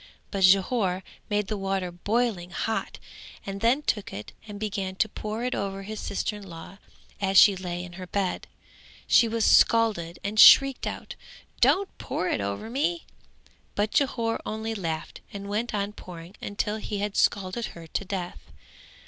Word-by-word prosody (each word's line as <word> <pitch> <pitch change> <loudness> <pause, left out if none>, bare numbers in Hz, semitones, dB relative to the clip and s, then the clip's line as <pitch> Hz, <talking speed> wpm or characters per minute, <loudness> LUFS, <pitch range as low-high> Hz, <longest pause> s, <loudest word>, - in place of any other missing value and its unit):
But 195 -1 -1
Jhore 190 0 +3 0.3
made 210 0 +1
the 210 +1 -4
water 195 -2 -2
boiling 205 0 -1
hot 220 +4 -3 0.5
and 195 0 -5
then 250 +6 +3
took 210 -8 -1
it 105 +2 -7 0.2
and 205 -1 -8
began 195 -3 -3
to 200 +3 +2
pour 215 +2 -5
it 250 - -1
over 195 0 -3
his 215 +2 -6
sister 210 +2 -2
in - - -11
law 180 +1 -11 0.4
as 195 -1 +2
she 200 0 +8
lay 180 -1 -5
on 175 - -11
her 185 0 -8
bed; 195 -1 -2 0.6
she 235 - +5
was 225 -1 0
scalded 210 -8 +4
and 210 +2 -2
shrieked 275 +2 +8
out - - -5 0.5
"Don't 395 0 +3
pour 180 - -2
it - - 0
over 100 - -3
me," 315 +8 -1 0.7
but 210 +1 0
Jhore 235 -6 +1
only 220 +1 -3
laughed 165 -6 -4
and 200 0 -7
went 215 +4 -2
on 205 -1 -2
pouring 175 -2 -10
until 210 +1 -2
he 210 -1 -4
had 205 0 -3
scalded 200 +3 +1
her 165 - -10
to 165 - -3
death. 185 -2 -6
200 Hz, 165 wpm, -26 LUFS, 185-220 Hz, 0.7 s, she